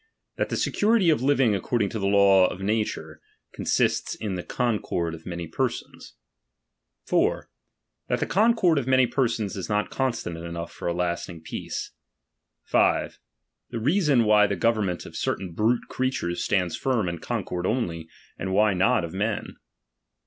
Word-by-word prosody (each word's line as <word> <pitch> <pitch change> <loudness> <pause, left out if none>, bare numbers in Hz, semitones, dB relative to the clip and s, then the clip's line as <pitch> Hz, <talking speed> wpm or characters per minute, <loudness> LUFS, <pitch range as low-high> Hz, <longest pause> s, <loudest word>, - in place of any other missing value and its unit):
That - - -1
the - - -2
eecurity 210 -5 +3
of 150 - +1
living 135 -4 +3
according 100 +2 0
to 110 - -4
the 100 - 0
laws 100 -2 +5
of 90 - -7
nature, 95 -7 -2 0.3
ooasista - - 0
in 105 -3 -3
the 90 - -3
concord 105 -8 -1
of 80 0 -10
many 85 -1 -4
persons. 80 - -4 0.9
4. - - +1 0.6
That - - 0
the - - 0
concord 205 -6 +3
of 130 - -5
many 130 -1 +5
persons 115 -6 -1
is 95 +1 -5
not 105 0 0
constant 120 -10 -2
enough 85 0 -6
for - - -6
a 85 - +1
lasting 85 -1 -3
peace. 80 - -5 0.8
S. - - +2 0.5
The 115 - -4
reason 145 - +3
why 105 -1 +5
t!ie 100 -1 -2
government 100 -3 0
of - - -11
certain 90 -3 -2
brute 110 +6 +1
creatureu 130 -9 -1 0.2
Blands 90 -5 +1
firm 120 -5 0
in 85 -1 -3
concord 90 +3 -3
only, 85 -9 -2 0.3
and 95 - -3
why 105 +1 +4
not 95 +3 +2
of 80 - -9
men. 105 +2 -2
105 Hz, 155 wpm, -25 LUFS, 90-125 Hz, 0.9 s, laws